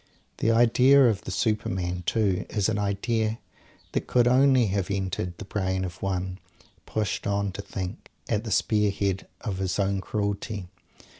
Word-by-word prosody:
The - - +1
idea 125 +4 +6
of 105 -4 0
the - - -5
Superman, 95 -4 -1
too, 100 -5 +1
is 105 -1 +1
an 105 -2 0
idea 110 +2 0 0.5
that - - -2
could 120 -1 +3
only 130 0 +5
have 100 -2 -1
entered 95 -3 -2
the - - -8
brain 95 -2 -1
of 90 0 -8
one, 95 -1 -2 0.5
pushed 105 -1 -2
on 100 0 0
to 95 - -6
think, 95 -2 -6 0.2
at 110 -1 0
the 115 - -5
spear 105 +1 +2
head 95 -1 -1
of 100 -5 -3
his 95 -1 -1
own 100 -1 +1
cruelty. 100 -2 -3
100 Hz, 160 wpm, -26 LUFS, 95-110 Hz, 0.5 s, idea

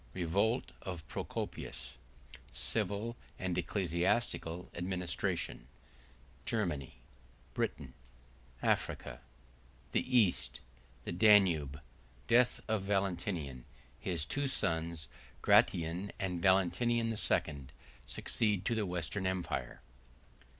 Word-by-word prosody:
— - - -25
Revolt 100 +8 +1
Of 85 -5 -6
Procopius.—Civil 100 - -4 0.2
And 95 -2 -2
Ecclesiastical 90 0 0
Administration.—Germany. 85 - -3 0.6
—Britain.—Africa.—The 60 - -3
East.— 65 - +2 0.4
The - - -4
Danube.—Death 80 - +3
Of 110 -2 +1
Valentinian.—His 85 - -2
Two 145 -1 -1
Sons, 80 - 0 0.4
Gratian 85 +4 +3
And 90 -3 -2
Valentinian 115 +5 +3
II., 75 -10 +1 0.4
Succeed 105 -4 0
To 115 - +2
The 110 -3 0
Western 90 +2 -1
Empire. 95 -1 -2
85 Hz, 70 wpm, -34 LUFS, 70-100 Hz, 0.6 s, Danube.—Death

